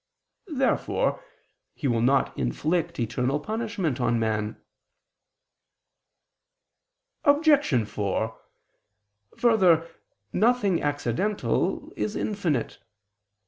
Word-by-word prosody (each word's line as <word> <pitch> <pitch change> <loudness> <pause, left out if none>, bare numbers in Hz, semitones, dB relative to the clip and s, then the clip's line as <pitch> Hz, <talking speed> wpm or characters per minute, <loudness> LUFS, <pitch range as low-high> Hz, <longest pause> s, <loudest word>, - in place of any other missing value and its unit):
Therefore 290 - 0 0.5
He 145 - -2
will 115 -3 +1
not 135 +3 +2
inflict 165 - -1
eternal 125 +4 0
punishment 205 - -2
on 120 -1 +2
man. 110 -1 -1 2.6
Obj. 285 - +4
4: 105 +2 -2 1.0
Further, 185 -9 +4 0.5
nothing 215 -6 +2
accidental 145 - -1
is 215 - -2
infinite. 175 - -2
160 Hz, 70 wpm, -26 LUFS, -, 2.6 s, Obj